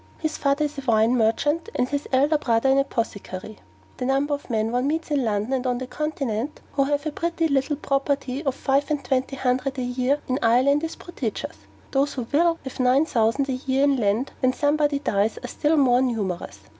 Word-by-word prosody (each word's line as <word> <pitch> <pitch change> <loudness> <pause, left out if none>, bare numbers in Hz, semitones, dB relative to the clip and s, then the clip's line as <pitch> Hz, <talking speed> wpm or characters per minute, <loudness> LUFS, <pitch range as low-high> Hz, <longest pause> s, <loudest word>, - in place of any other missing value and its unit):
His 315 -1 -2
father 280 +2 +1
is 295 -1 -5
a - - -5
wine 230 -1 +3
merchant; 290 - +1
and 250 - +1
his 285 +2 -3
elder 285 +4 +3
brother 235 -1 +2
an 270 +1 +4
apothecary. 215 -6 -4 0.4
The 250 - -3
number 275 +2 +1
of 285 - -5
men 220 -1 0
one 250 +2 0
meets 320 +1 -2
in 285 -3 +2
London 215 +2 -1
and 260 -1 -1
on 250 -1 0
the 255 - -4
Continent 275 -3 -3
who 275 -1 +2
have 290 +1 -1
a 310 - -1
pretty 335 +1 -1
little 280 0 +1
property 275 -1 -1
of 270 -2 -1
five 275 +2 +1
and 295 -2 -2
twenty 265 0 0
hundred 260 +1 -1
a 255 - -1
year 250 +3 0
in 255 +1 0
Ireland 260 +6 +3
is 325 - -3
prodigious: 260 -11 -5 0.3
those 280 +1 +1
who 250 -3 -3
WILL 335 +2 +3
have 265 -1 -8
nine 255 +4 +4
thousand 235 +1 +1
a 265 - -1
year 265 +1 0
in 285 -1 +4
land 220 +3 0
when 255 -1 +2
somebody 290 0 +1
dies 215 -6 0
are - - -4
still 300 +5 +1
more 255 -3 +4
numerous. 195 - -2
270 Hz, 205 wpm, -24 LUFS, 245-290 Hz, 0.4 s, an